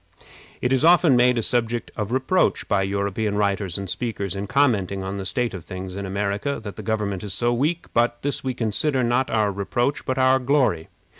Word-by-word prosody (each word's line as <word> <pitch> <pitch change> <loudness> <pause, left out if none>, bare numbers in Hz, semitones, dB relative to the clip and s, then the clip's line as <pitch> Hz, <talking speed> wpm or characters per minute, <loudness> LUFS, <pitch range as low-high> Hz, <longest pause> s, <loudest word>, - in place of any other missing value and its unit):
It 125 - +2
is 130 - +1
often 170 -4 +6
made 125 0 +4
a 115 - 0
subject 120 0 0
of 105 +1 -3
reproach 130 +9 +1
by 100 - +2
European 100 +2 -1
writers 100 -3 0
and 100 0 -5
speakers, 100 -3 -3
in 100 +1 -4
commenting 100 -8 +1
on 95 +1 -4
the 95 -1 -3
state 120 +6 -1
of 90 -4 -7
things 95 +1 -7
in 100 0 -4
America, 100 +8 -2
that 105 -2 -7
the - - -7
government 105 -4 -2
is 100 -2 -4
so 120 +3 +1
weak; 155 +8 0
but 120 0 +2
this 145 0 -1
we 130 -1 -2
consider 125 +5 0
not 120 +2 +1
our 105 -2 +1
reproach, 120 +7 -1
but 130 - -2
our 130 0 +4
glory. 125 - +1
110 Hz, 205 wpm, -23 LUFS, 100-130 Hz, -, often